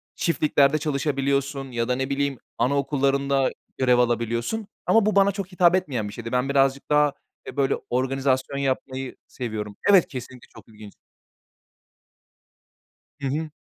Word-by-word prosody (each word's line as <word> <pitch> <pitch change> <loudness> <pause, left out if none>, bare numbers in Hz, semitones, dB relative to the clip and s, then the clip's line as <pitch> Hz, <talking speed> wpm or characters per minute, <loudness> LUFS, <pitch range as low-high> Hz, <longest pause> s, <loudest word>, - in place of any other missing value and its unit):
çiftliklerde 155 -3 +2
çalışabiliyorsun 140 -2 -1
ya 115 0 -1
da, 125 - +1
ne 135 +1 -2
bileyim, 140 -1 -1 0.2
anaokullarında 140 0 +1 0.3
görev 125 -2 +3
alabiliyorsun. 120 - 0 0.2
Ama 225 -2 +4
bu 215 - +1
bana 200 0 +5
çok 195 -1 -5
hitap 180 -1 +4
etmeyen 135 - -1
bir 100 - -8
şeydi. 115 +1 -7
Ben 125 +2 0
birazcık 135 0 +1
daha, 150 -1 +3 0.3
eee, 130 - -8
böyle, 140 -1 +2
organizasyon 130 +1 0
yapmayı 130 -1 -2
seviyorum. 105 -4 -5
Evet, 195 -4 +6
kesinlikle 125 -2 -9
çok - - -15
ilginç. 105 -2 -13 2.3
Hı 135 - -1
hı. 155 +3 -2
135 Hz, 135 wpm, -24 LUFS, 125-145 Hz, 2.3 s, Evet